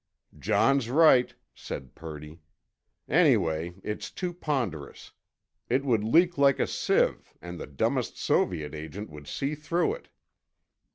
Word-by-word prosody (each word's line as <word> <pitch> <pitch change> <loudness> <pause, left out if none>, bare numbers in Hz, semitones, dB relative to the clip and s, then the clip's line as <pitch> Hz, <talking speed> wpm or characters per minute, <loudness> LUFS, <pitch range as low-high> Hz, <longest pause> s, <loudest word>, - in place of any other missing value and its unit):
"John's 135 -4 +2
right," 135 -3 +5 0.2
said 65 -1 -8
Purdy. 75 0 -10 0.7
"Anyway, 80 +2 +2
it's 105 - -4
too 180 -2 -4
ponderous. 125 - -4 0.6
It 130 +3 +1
would 115 -6 +2
leak 170 +8 +3
like 140 -1 +4
a - - +2
sieve, - - 0
and 85 -1 -8
the - - -6
dumbest 70 -2 -1
Soviet 75 -5 0
agent 80 +6 -7
would 75 -1 -11
see 140 +2 -2
through 165 - 0
it." - - -11
110 Hz, 125 wpm, -27 LUFS, -, 0.7 s, right